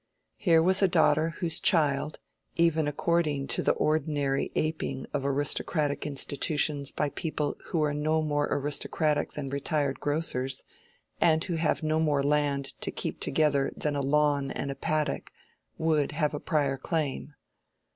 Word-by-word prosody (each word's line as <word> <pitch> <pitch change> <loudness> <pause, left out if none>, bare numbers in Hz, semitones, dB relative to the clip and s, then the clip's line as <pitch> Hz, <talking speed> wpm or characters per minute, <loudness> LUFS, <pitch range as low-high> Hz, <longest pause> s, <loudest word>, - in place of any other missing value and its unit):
Here 165 -5 +4
was 190 +2 +4
a 195 - +5
daughter 160 -1 +2
whose 165 -2 +2
child—even 155 +1 0
according 150 -2 0
to - - +1
the - - +2
ordinary 145 -3 0
aping 155 -4 -2
of 145 -2 -1
aristocratic 145 +2 0
institutions 145 0 +1
by 150 - -1
people 155 -4 -2
who 165 -3 -1
are 150 -1 0
no 155 +2 0
more 145 -1 0
aristocratic 145 +1 0
than 140 -2 -5
retired 140 -1 -1
grocers, 140 -3 -1 0.6
and 160 -1 +3
who 180 - -3
have 160 0 0
no 155 0 +1
more 150 -3 +1
land 145 -1 0
to - - -1
"keep - - -4
together" 145 -2 +2
than 150 -1 -1
a 140 - -1
lawn 145 0 +1
and 140 +1 -3
a - - -6
paddock—would 150 - -2
have 150 -1 0
a 145 - -3
prior 145 -5 0
claim. 150 -1 -3
150 Hz, 145 wpm, -28 LUFS, 140-155 Hz, 0.6 s, a